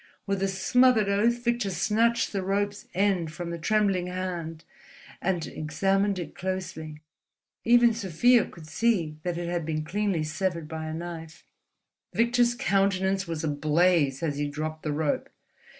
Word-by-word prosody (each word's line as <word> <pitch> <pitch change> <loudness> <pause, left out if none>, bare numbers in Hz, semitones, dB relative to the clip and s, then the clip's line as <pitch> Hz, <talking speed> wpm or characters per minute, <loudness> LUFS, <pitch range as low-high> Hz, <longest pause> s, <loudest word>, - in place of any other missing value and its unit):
With 195 -1 -1
a 195 - +2
smothered 220 +3 +3
oath 235 +4 +2
Victor 235 -3 0
snatched 220 +7 +1
the 195 - -1
rope's 200 +2 -2
end 185 -4 +1
from 170 +2 -6
the 170 - -5
trembling 195 -1 +1
hand 175 -3 -4 0.6
and 175 -3 0
examined 195 +5 0
it 170 -4 -6
closely. 160 -5 -5 0.6
Even 240 0 +6
Sofia 230 +4 +3
could 165 -3 -13
see 160 -3 0
that 175 0 -3
it 175 0 -3
had 175 -1 -1
been 155 -1 -3
cleanly 195 -2 0
severed 165 0 -2
by 160 0 -5
a 155 - -4
knife. 165 0 -8 0.7
Victor's 240 +1 +3
countenance 195 -2 +1
was 165 -2 -4
ablaze 150 -1 +2
as 145 -3 -1
he 145 - 0
dropped 155 +2 -4
the 150 - -2
rope. 150 0 -1
185 Hz, 150 wpm, -27 LUFS, 160-205 Hz, 0.7 s, Even